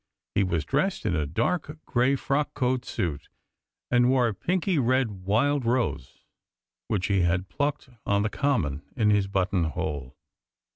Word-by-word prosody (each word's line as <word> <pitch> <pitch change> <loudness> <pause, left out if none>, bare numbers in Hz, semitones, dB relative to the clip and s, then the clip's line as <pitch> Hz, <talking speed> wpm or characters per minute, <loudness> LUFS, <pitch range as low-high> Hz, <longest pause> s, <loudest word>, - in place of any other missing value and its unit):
He - - +2
was 85 -5 -1
dressed 150 +8 0
in 90 - +1
a 75 -2 0
dark 145 - -1
grey 130 +1 +2
frock 140 +2 -1
coat 125 0 0
suit, 80 -9 -3 0.6
and 120 0 +4
wore 130 -2 +4
a - - -3
pinky 180 - 0
red 130 -2 +2 0.2
wild 140 +7 +2
rose, 120 - -1 0.6
which 100 -3 0
he 100 -2 +2
had 90 +2 +1
plucked 145 -1 -2 0.2
on 100 0 +1
the 105 - 0
Common, 100 - 0
in 110 -4 +3
his 100 -1 +2
button 95 -2 +1
hole. 75 -4 -4
115 Hz, 155 wpm, -26 LUFS, 90-135 Hz, 0.6 s, and